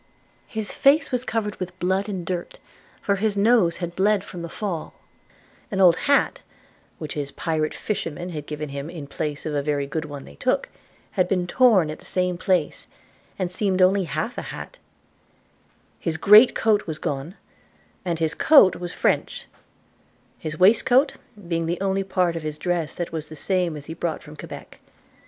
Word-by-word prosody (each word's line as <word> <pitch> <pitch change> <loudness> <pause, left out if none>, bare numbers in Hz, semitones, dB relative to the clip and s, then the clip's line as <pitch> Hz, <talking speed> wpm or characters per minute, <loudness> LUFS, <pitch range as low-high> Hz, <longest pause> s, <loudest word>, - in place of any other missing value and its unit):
His 220 -2 -4
face 285 +3 +4
was 250 -1 0
covered 220 -4 -2
with 185 0 -6
blood 190 +3 0
and 185 -4 -4
dirt, 175 0 -4 0.5
for 200 -1 +1
his 205 0 0
nose 200 -5 +4
had 175 -1 -5
bled 200 +1 +2
from 180 -3 -8
the 170 - -6
fall; 180 -4 -4 0.7
an 195 - -3
old 180 -3 +7
hat, 280 - +3 0.6
which 155 -3 -6
his 145 -2 -4
pirate 155 -1 -2
fisherman 175 -4 -4
had 150 -4 -6
given 150 0 -5
him 140 +2 -5
in 165 -4 -7
place 145 +1 -4
of 155 - -2
a 145 - +1
very 145 -1 -1
good 155 +3 -3
one 145 -2 -8
they 70 - -13
took, - - 0 0.4
had 180 -1 +1
been 180 -2 0
torn 195 -6 +4
at 155 - -8
the - - -17
same 180 -1 0
time, 180 -6 +2 0.7
and 185 -2 -2
seemed 190 0 0
only 190 +1 +4
half 160 - -3
a - - -7
hat; - - -8 1.2
his 160 -1 -2
great 210 +7 +7
coat 210 -3 +2
was 155 -2 -4
gone, 150 +3 -4 0.7
and 175 -3 -1
his 160 -1 0
coat 280 - +6
was 175 -1 -6
French; - - 0 0.9
his 155 0 -5
waistcoat 245 - +4 0.3
being 165 -1 -1
the 175 +1 -2
only 195 0 0
part 180 -3 0
of 165 - -3
his 155 -1 -5
dress 170 -1 -2
that 175 - -4
was 160 -2 -4
the 155 - -9
same 180 -1 0
as 145 - -10
he 160 - -6
brought 165 -1 -3
from 150 0 -12
Quebec. - - -10
175 Hz, 180 wpm, -24 LUFS, 155-195 Hz, 1.2 s, old